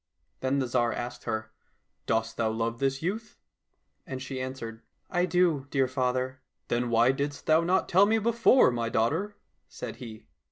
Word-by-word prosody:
Then 130 +1 0
the 135 - +1
Tsar 120 -1 +1
asked 120 +1 -5
her, 110 0 -3 0.3
" - - -49
Dost 115 0 0
thou 115 -1 +1
love 115 +1 -2
this 135 +1 0
youth? 215 +5 -3 0.2
" - - -51
— - - -46
And 130 - -5
she 130 0 -5
answered, 115 -4 -6 0.3
"I 180 -1 +2
do, 170 -7 +2
dear 135 -2 +2
father." 130 0 -1
— - - -58
" - - -52
Then 120 0 0
why 115 +2 +4
didst 140 +1 -3
thou 160 +1 +5
not 180 +3 +1
tell 195 +3 +5
me 220 +1 +3
before, 235 - +4
my 115 -1 -1
daughter? 160 - 0
" - - -47
said - - -7
he. 110 - -10
130 Hz, 200 wpm, -28 LUFS, 115-165 Hz, 0.3 s, thou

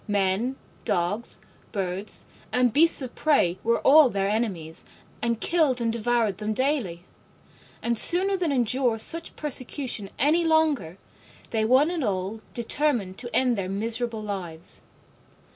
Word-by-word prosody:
Men, 205 +5 0 0.3
dogs, 205 +2 -1 0.3
birds 195 0 -4 0.3
and 250 -2 +2
beasts 325 -2 +3
of 250 - -7
prey 190 - +2
were 230 +1 +2
all 295 -1 +7
their 195 -2 -1
enemies, 195 -7 -2 0.4
and 235 -1 0
killed 300 -4 +2
and 230 -1 0
devoured 230 -3 0
them 215 0 -2
daily: 250 - -1 0.8
and 235 0 +1
sooner 370 - +6
than 350 -5 -1
endure 250 -2 +1
such 330 +9 -1
persecution 255 -6 -3
any 310 +6 +3
longer, 310 - +1 0.5
they 220 -1 +1
one 265 +8 +4
and 340 -5 -2
all 195 +1 -2
determined 235 -6 -1
to 240 - -5
end 250 -2 +3
their 190 -3 -3
miserable 225 +2 -2
lives. 180 -5 -6
235 Hz, 135 wpm, -25 LUFS, 200-275 Hz, 0.8 s, all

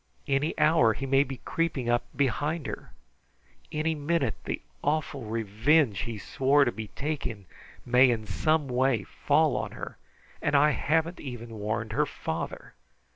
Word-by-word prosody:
Any 140 +3 0
hour 150 -7 +4
he 135 - -5
may 135 +1 +4
be 135 -2 -8
creeping 160 -7 -1
up 120 0 +2
behind 145 +4 0
her! - - -6 0.8
Any 155 +1 0
minute 160 +3 0
the - - -2 0.2
awful 145 -4 -1
revenge 115 - +2
he 115 -2 -4
swore 135 +7 +3
to 120 - +1
be 110 -2 -6
taking 135 -9 -3 0.4
may 125 +1 +6
in 110 -3 -1
some 150 +9 +1
way 125 -3 +1
fall - - +2
on - - -3
her, - - -8 0.4
and - - +1
I 150 +2 +6
haven't 160 +4 0
even 120 -4 -7
warned 105 +1 -2
her - - +2
father. - - -5
135 Hz, 150 wpm, -28 LUFS, 115-150 Hz, 0.8 s, may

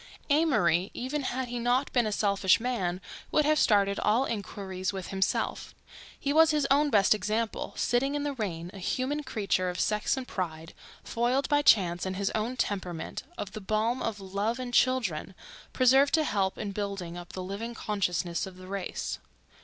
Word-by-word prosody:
Amory, 200 - +3
even 270 +4 -2
had 260 -1 -2
he 240 0 -3
not 245 +3 +1
been 240 -3 +3
a - - -1
selfish 200 -2 +3
man, 195 -8 -1 0.3
would 305 - +2
have 305 0 +3
started 200 -2 +3
all 230 +6 +2
inquiries 195 -4 -4
with 190 -2 -6
himself. 190 -1 -1 0.4
He 285 -1 -1
was 320 +1 +6
his 300 -2 +2
own 290 +2 +4
best 205 -5 +5
example—sitting 230 +5 -1
in 290 - -1
the 290 -1 -1
rain, 180 -8 -4
a 200 - -9
human 260 +10 -1
creature 195 -7 0
of 180 -1 -5
sex 210 +4 +1
and 260 -1 -5
pride, 165 -3 -5 0.3
foiled 245 +4 0
by 290 -1 +4
chance 175 -10 +4
and 190 - -3
his 195 +1 -1
own 230 +4 -2
temperament 185 -7 -3 0.2
of 200 - -5
the 215 - -7
balm 215 +5 0
of 220 -2 -2
love 200 +4 -2
and 250 -1 -5
children, 225 -10 +1 0.4
preserved 270 +3 +5
to 315 - +2
help 195 -8 0
in 205 - -4
building 195 -4 -4
up 175 0 -9
the 185 - -5
living 210 +5 -5
consciousness 180 -5 -1
of 185 -1 -11
the 185 - -11
race. 195 -1 -4
210 Hz, 175 wpm, -29 LUFS, 190-255 Hz, 0.4 s, was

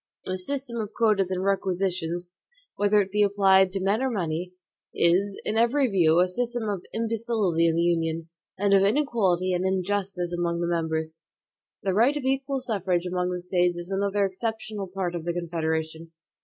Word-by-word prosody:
The 185 0 -3
system 250 +2 -3
of 210 -1 -6
quotas 210 -5 +2
and 185 0 -2
requisitions, 185 -3 -1 0.5
whether 205 0 +3
it 190 - -11
be 210 +1 +1
applied 195 -2 +4
to 195 - -1
men 200 +5 +1
or 265 - +1
money, 180 -4 -3 0.4
is, 190 +4 +2
in 215 - -1
every 255 +4 +3
view, 170 -6 +3
a 180 - +3
system 240 +4 -2
of 200 -3 -2
imbecility 225 -7 0
in 165 - +1
the 170 - +2
Union, 165 -1 0 0.3
and 200 +1 +2
of 195 - +6
inequality 195 -6 +1
and 180 0 0
injustice 190 -1 -1
among 170 -1 -1
the 170 - 0
members. 160 -1 -2 0.6
The 195 -1 0
right 245 +9 +3
of 290 - -4
equal 270 +1 -1
suffrage 190 -7 -1
among 180 0 -1
the 180 0 -3
States 180 -1 +1
is 175 +2 -4
another 200 +1 +1
exceptionable 215 0 -4
part 185 -1 -3
of 170 -2 -4
the 170 +1 -2
Confederation. 160 -1 -3
190 Hz, 175 wpm, -26 LUFS, 175-210 Hz, 0.6 s, of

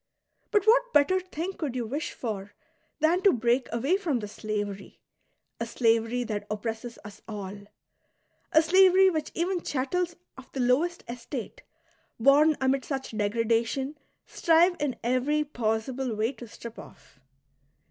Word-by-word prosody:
But 415 -2 +2
what 485 +2 +4
better 335 +6 +4
thing 370 0 -5
could 290 -8 -4
you 245 -2 -2
wish 285 +8 -4
for 205 -4 -5 0.5
than 335 +4 +3
to 395 - +6
break 240 +1 +1
away 270 +11 +1
from 335 -10 -1
this 210 -3 -6
slavery, 205 -2 -5 0.3
— - - -50
a 230 - -2
slavery 230 +1 +1
that 210 -3 -4
oppresses 225 +2 -4
us 205 -1 -11
all, 200 -3 -6 1.0
a 315 - +6
slaveiy 375 +2 +5
which 310 -2 -2
even 355 +1 0
chattels 340 +7 -1 0.2
of 265 - -15
the 270 - -4
lowest 280 +8 +1
estate, 240 +1 -6 0.6
bom 290 +5 +5
amid 265 0 +1
such 270 -5 -5
degradation, 230 +6 0 0.3
strive 340 +2 +3
in 290 -4 -1
every 255 +5 +1
possible 245 -1 -2
way 220 +3 0
to 240 -2 -11
strip 230 +1 -10
off.'' 140 - -15
255 Hz, 145 wpm, -27 LUFS, 225-320 Hz, 1.0 s, to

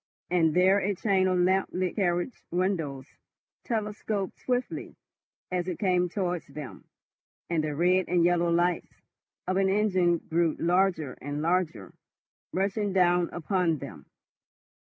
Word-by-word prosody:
And 165 -3 +3
there 190 +2 +5
a 200 +1 -1
chain 190 -1 +2
of 185 -1 +1
lamp 185 +2 +2
lit 185 -1 -1
carriage 175 +3 -1
windows 165 -7 -1 0.6
telescoped 210 -3 -3
swiftly 250 0 -3 0.6
as 180 -1 -1
it 180 - -3
came 180 -2 +1
towards 180 -2 -2
them, 145 -1 -9 0.7
and 160 -2 +1
the 150 -1 -2
red 180 +3 +3
and 175 -1 +2
yellow 175 -1 +2
lights 175 +1 0 0.4
of 185 +1 0
an 195 0 +3
engine 185 -4 +2
grew 165 -1 0
larger 175 -5 +1
and 145 +2 -4
larger, 160 - -1 0.6
rushing 200 +1 -1
down 175 -2 +3
upon 175 -1 0
them. - - -10
180 Hz, 135 wpm, -28 LUFS, 170-190 Hz, 0.7 s, there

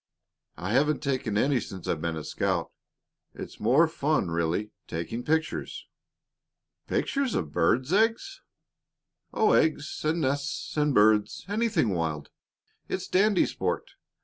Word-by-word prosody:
I 95 +4 -4
haven't 150 +5 +2
taken 130 -7 -1
any 135 +3 +2
since 95 -5 -8
I've 80 - -1
been 85 -1 -2
a 80 - -5
scout. - - -1 0.6
It's - - -9
more 130 +10 +4
fun, 150 - 0
really, 85 +6 -1 0.2
taking 85 +8 -4
pictures." 160 +2 -2 1.0
"Pictures 275 -4 0
of 80 -5 -2
birds' 125 - +1
eggs?" 225 - +1 0.9
"Oh, 220 - +3
eggs 155 -1 +1
and 160 +2 0
nests 140 +1 -2
and 150 -3 +1
birds 105 0 +3
anything 205 - +1
wild. 80 -5 -2 0.6
It's 185 0 -3
dandy 200 +1 +3
sport. - - -3
140 Hz, 125 wpm, -27 LUFS, 95-160 Hz, 1.0 s, more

